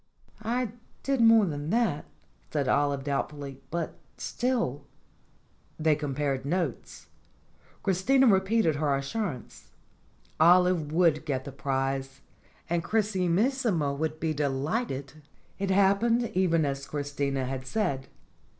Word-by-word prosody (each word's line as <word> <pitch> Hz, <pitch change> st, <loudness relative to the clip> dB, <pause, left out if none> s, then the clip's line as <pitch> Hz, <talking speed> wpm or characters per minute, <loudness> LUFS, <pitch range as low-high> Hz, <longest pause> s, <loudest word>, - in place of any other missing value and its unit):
"I 235 Hz, +1 st, -1 dB, 0.3 s
did 275 Hz, -3 st, +1 dB
more 225 Hz, -2 st, +7 dB
than 145 Hz, -3 st, -4 dB
that," 215 Hz, -9 st, +1 dB, 0.4 s
said 145 Hz, -3 st, -1 dB
Olive 140 Hz, -1 st, +1 dB
doubtfully. 140 Hz, -1 st, -4 dB
"But, 170 Hz, 0 st, -4 dB, 0.2 s
still 240 Hz, -, -2 dB, 0.4 s
" -, -, -37 dB
They 155 Hz, -1 st, +3 dB
compared 140 Hz, -2 st, -2 dB
notes. 160 Hz, -3 st, -3 dB, 0.8 s
Christina 225 Hz, +9 st, +3 dB
repeated 190 Hz, -, +3 dB
her 145 Hz, -2 st, +1 dB
as 135 Hz, 0 st, -3 dB
surance. 170 Hz, -, -5 dB, 0.7 s
Olive 175 Hz, -2 st, +4 dB
would 160 Hz, -2 st, +3 dB
get 135 Hz, -4 st, -2 dB
the 140 Hz, -, -6 dB
prize, 135 Hz, 0 st, -2 dB, 0.5 s
and 170 Hz, -1 st, 0 dB
Chrisimis 210 Hz, +5 st, +1 dB
sima 155 Hz, -, +1 dB
would 155 Hz, +1 st, -3 dB
be 160 Hz, -1 st, 0 dB
delighted. 145 Hz, -, -2 dB, 0.4 s
It 195 Hz, 0 st, -1 dB
happened 200 Hz, +5 st, +3 dB
even 170 Hz, -4 st, +2 dB
as 140 Hz, -1 st, -3 dB
Christina 140 Hz, -2 st, -2 dB
had 130 Hz, 0 st, -5 dB
said. 140 Hz, -9 st, -1 dB
155 Hz, 120 wpm, -28 LUFS, 140-195 Hz, 0.8 s, more